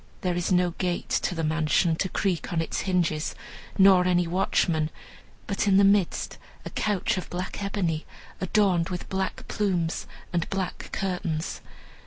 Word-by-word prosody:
There 180 Hz, -1 st, 0 dB
is 175 Hz, +1 st, -1 dB
no 180 Hz, -1 st, +3 dB
gate 180 Hz, -2 st, -1 dB
to 180 Hz, -, -1 dB
the 165 Hz, -, -2 dB
mansion, 160 Hz, +2 st, +2 dB
to 190 Hz, -, 0 dB
creak 180 Hz, -4 st, -1 dB
on 170 Hz, -, 0 dB
its 165 Hz, -, -1 dB
hinges, 170 Hz, -5 st, 0 dB, 0.4 s
nor 190 Hz, -2 st, +7 dB
any 175 Hz, -1 st, +3 dB
watchman; 165 Hz, -3 st, +1 dB, 0.6 s
but 200 Hz, 0 st, -1 dB
in 195 Hz, -1 st, +5 dB
the 200 Hz, -, +6 dB
midst 200 Hz, -2 st, +2 dB, 0.3 s
a -, -, -6 dB
couch 210 Hz, 0 st, 0 dB
of -, -, -8 dB
black 180 Hz, +3 st, -4 dB
ebony, 185 Hz, -6 st, -1 dB, 0.3 s
adorned 185 Hz, -3 st, +2 dB
with 180 Hz, -1 st, -5 dB
black 190 Hz, 0 st, -3 dB
plumes 180 Hz, -5 st, -1 dB, 0.3 s
and 170 Hz, -1 st, 0 dB
black 190 Hz, -2 st, -3 dB
curtains. 175 Hz, -4 st, -2 dB
180 Hz, 155 wpm, -26 LUFS, 170-195 Hz, 0.6 s, nor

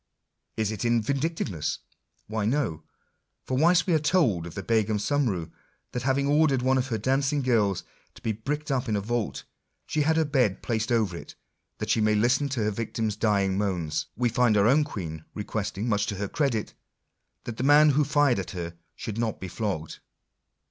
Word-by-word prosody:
Is 110 Hz, -1 st, 0 dB
it 105 Hz, -, -4 dB
in 115 Hz, -1 st, +2 dB
vindictaveness? 135 Hz, -, -2 dB, 0.5 s
Why 110 Hz, -1 st, -2 dB
no: 110 Hz, -, 0 dB, 0.6 s
for 130 Hz, -, -2 dB
whilst 165 Hz, +4 st, +4 dB
we 180 Hz, -, +1 dB
are 160 Hz, -, +4 dB
told 145 Hz, -, +2 dB
of 85 Hz, -, -10 dB
the 95 Hz, -, -4 dB
Begum 110 Hz, 0 st, +1 dB
Sumroo, 105 Hz, -, 0 dB, 0.4 s
that 125 Hz, -, -3 dB
having 135 Hz, +2 st, +1 dB
ordered 145 Hz, -3 st, +3 dB
one 130 Hz, 0 st, +3 dB
of 130 Hz, -, -1 dB
her 115 Hz, -4 st, -1 dB
dancing 135 Hz, +5 st, +1 dB
girls 105 Hz, -7 st, +2 dB, 0.3 s
to -, -, -14 dB
he 110 Hz, -, 0 dB
bricked 145 Hz, +8 st, -3 dB
up 130 Hz, -2 st, 0 dB
in 105 Hz, -, +1 dB
a -, -, +1 dB
vault, 115 Hz, +2 st, -2 dB, 0.4 s
she 155 Hz, -, -1 dB
had 160 Hz, +2 st, +2 dB
her 160 Hz, -, +3 dB
bed 125 Hz, -10 st, +1 dB
placed 115 Hz, +1 st, -1 dB
over 110 Hz, -7 st, +1 dB
it, -, -, -9 dB, 0.4 s
that -, -, -2 dB
she 110 Hz, -, +2 dB
might 105 Hz, 0 st, +3 dB
listen 130 Hz, +6 st, +2 dB
to 130 Hz, -5 st, -1 dB
her 105 Hz, -, +1 dB
victim's 110 Hz, 0 st, -2 dB
dying 100 Hz, -3 st, +1 dB
moans; 90 Hz, -7 st, -1 dB
we 125 Hz, -, +2 dB
find 120 Hz, -2 st, +3 dB
our 100 Hz, -, +4 dB
own 140 Hz, +6 st, +5 dB
Queen 80 Hz, -, -6 dB
requesting, 105 Hz, 0 st, -3 dB
much 105 Hz, -3 st, +1 dB
to 100 Hz, -, -2 dB
her 100 Hz, +1 st, -3 dB
credit, 120 Hz, -4 st, -1 dB, 0.7 s
that 115 Hz, -2 st, -6 dB
the -, -, -2 dB
man 145 Hz, +2 st, +6 dB
who 150 Hz, +2 st, +3 dB
fired 145 Hz, -3 st, +3 dB
at -, -, -5 dB
her 85 Hz, -1 st, -4 dB, 0.2 s
should 110 Hz, 0 st, -5 dB
not 115 Hz, -2 st, -1 dB
be 95 Hz, -, -5 dB
flogged. 90 Hz, -5 st, -4 dB
115 Hz, 195 wpm, -27 LUFS, 105-140 Hz, 0.7 s, man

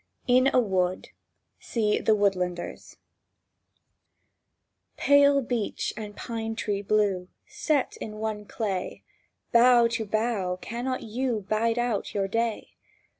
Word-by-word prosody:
IN 255 Hz, +1 st, +4 dB
A -, -, +4 dB
WOOD 185 Hz, -5 st, 0 dB, 0.5 s
See 215 Hz, -3 st, 0 dB
"THE 220 Hz, -, +3 dB
WOODLANDERS" 180 Hz, -4 st, -2 dB, 2.0 s
PALE 285 Hz, -1 st, +5 dB
beech 235 Hz, -3 st, -2 dB
and 210 Hz, -1 st, -7 dB
pine 225 Hz, -1 st, -4 dB
tree 205 Hz, -3 st, -2 dB
blue, 200 Hz, -3 st, +1 dB, 0.2 s
Set 295 Hz, -4 st, -1 dB
in 215 Hz, -, -7 dB
one 215 Hz, -1 st, -4 dB
clay, 200 Hz, -4 st, -4 dB, 0.5 s
Bough 240 Hz, 0 st, +6 dB
to 225 Hz, -1 st, -2 dB
bough 210 Hz, -4 st, -1 dB
cannot 245 Hz, +5 st, -4 dB
you 235 Hz, 0 st, -2 dB
Bide 225 Hz, +2 st, +1 dB
out 240 Hz, -4 st, -1 dB
your 195 Hz, -1 st, 0 dB
day? 230 Hz, +2 st, -2 dB
220 Hz, 115 wpm, -26 LUFS, 205-240 Hz, 2.0 s, Bough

